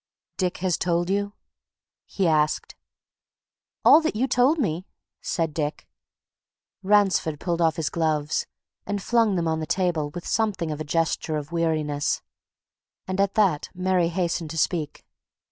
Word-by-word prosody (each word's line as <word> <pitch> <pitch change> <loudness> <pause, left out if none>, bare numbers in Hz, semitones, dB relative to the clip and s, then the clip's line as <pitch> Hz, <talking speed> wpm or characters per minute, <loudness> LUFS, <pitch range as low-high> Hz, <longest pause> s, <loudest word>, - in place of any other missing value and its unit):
"Dick 180 -2 -1
has 180 -3 +1
told 175 +1 0
you?" 200 +1 -1 0.7
he 190 -3 0
asked. 155 -1 +1 1.1
"All 315 - +8
that 315 -8 -1
you 250 +5 +1
told 255 +5 +3
me," 185 - -1 0.3
said 165 -3 -1
Dick. 150 -1 -3 0.9
Ransford 195 -6 +2
pulled 175 -1 -1
off 160 -2 +3
his 160 -4 -2
gloves 155 -3 0 0.4
and 205 0 -1
flung 225 0 +2
them 170 -2 0
on 160 0 0
the 155 - -4
table 175 -6 0
with 175 +3 -8
something 200 -7 0
of 150 0 -4
a - - -1
gesture 160 0 -1
of 150 +2 -6
weariness. 155 -4 0 0.8
And 185 +1 0
at 200 -1 0
that 190 -9 +2
Mary 185 -1 +1
hastened 170 -2 -2
to 165 - -6
speak. 155 -1 -1
170 Hz, 145 wpm, -25 LUFS, 155-195 Hz, 1.1 s, All